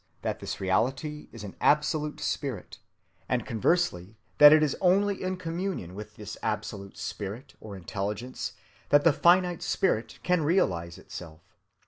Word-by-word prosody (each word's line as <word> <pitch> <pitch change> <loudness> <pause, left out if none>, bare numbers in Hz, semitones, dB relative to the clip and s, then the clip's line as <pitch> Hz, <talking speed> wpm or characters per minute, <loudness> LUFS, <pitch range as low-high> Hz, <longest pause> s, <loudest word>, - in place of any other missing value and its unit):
that - - -2
this - - -5
reality 135 +10 -1
is 115 -3 -9
an 100 - -8
absolute 150 0 +2
Spirit, 135 -10 -4 0.5
and 125 -3 0
conversely 110 - 0 0.2
that 150 0 +11
it 155 0 +6
is 150 - +1
only 195 +2 +3
in 185 0 -2
communion 170 - -4
with 105 +2 -9
this 105 0 -8
absolute 105 -3 -4
Spirit 110 +7 -6
or 105 -2 -8
Intelligence 105 +6 -4 0.4
that 145 0 +5
the 165 - +5
finite 175 +2 +4
Spirit 120 - 0
can 180 -2 +2
realize 90 - +1
itself. 80 -2 -10
130 Hz, 140 wpm, -28 LUFS, 105-165 Hz, 0.5 s, that